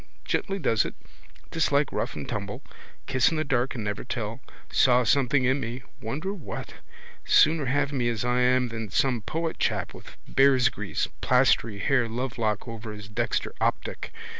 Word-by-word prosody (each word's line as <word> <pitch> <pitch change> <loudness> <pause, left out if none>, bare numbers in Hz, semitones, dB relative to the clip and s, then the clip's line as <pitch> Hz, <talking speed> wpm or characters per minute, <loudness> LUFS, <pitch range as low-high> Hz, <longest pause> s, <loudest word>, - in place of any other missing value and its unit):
Gently 195 -1 -1
does 115 - +2
it. - - -6 0.6
Dislike 145 -3 +2
rough - - -2
and - - -6
tumble. - - -4 0.4
Kiss 130 -3 +3
in 160 - -2
the 155 - +1
dark 130 -3 0
and 115 - -4
never 105 -1 -3
tell. 115 -1 -4 0.3
Saw 125 -1 +5
something 135 +3 +3
in 130 +3 +2
me. 120 0 -5 0.2
Wonder 155 - -3
what. 180 -8 -7 0.5
Sooner 155 -1 +4
have 140 +2 +1
me 120 -3 +1
as 115 0 -2
I 125 0 +2
am 125 0 +3
than 115 -2 -5
some 125 +2 +1
poet 165 +7 -3
chap - - 0
with - - -13
bearsgrease 130 -6 +2
plastery 125 -4 +3
hair, 125 -2 +2
lovelock 115 -2 -2
over 115 -1 -6
his 105 -1 -9
dexter 105 - -1
optic. - - -1
125 Hz, 165 wpm, -26 LUFS, 115-140 Hz, 0.6 s, Saw